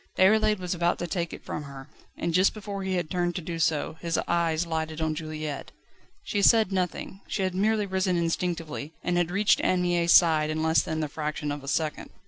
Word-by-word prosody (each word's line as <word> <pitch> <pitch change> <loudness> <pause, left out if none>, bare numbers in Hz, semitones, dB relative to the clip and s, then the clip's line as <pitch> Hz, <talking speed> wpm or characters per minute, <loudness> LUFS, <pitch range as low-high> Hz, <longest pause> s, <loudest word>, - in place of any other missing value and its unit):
Déroulède 215 +2 +4
was 180 -1 -3
about 175 0 +1
to 175 - -3
take 170 -1 -2
it - - -10
from - - -4
her, 140 -2 -10 0.3
and 170 - -2
just 185 +5 +3
before 205 -2 -5
he 190 -1 -1
had 175 -3 -1
turned 175 +1 -1
to - - -1
do 165 0 -5
so, 155 0 0
his 170 -1 -1
eyes 170 -1 +1
lighted 160 -1 -3
on 160 -1 0
Juliette. 155 -2 -5 0.5
She 205 - -1
said 220 0 +5
nothing, 190 +1 -3
she 195 - -2
had 185 -1 -1
merely 210 +2 +1
risen 190 -2 0
instinctively, 165 -3 -2
and 180 - 0
had 175 -1 +1
reached 200 +3 +3
Anne 180 -1 +2
Mie's 175 -1 +2
side 155 -3 +5
in 155 0 -1
less 160 0 +4
than 160 0 -3
the 155 - -1
fraction 150 0 -3
of 145 -1 -5
a - - -10
second. 155 +2 -2
170 Hz, 215 wpm, -27 LUFS, 155-185 Hz, 0.5 s, said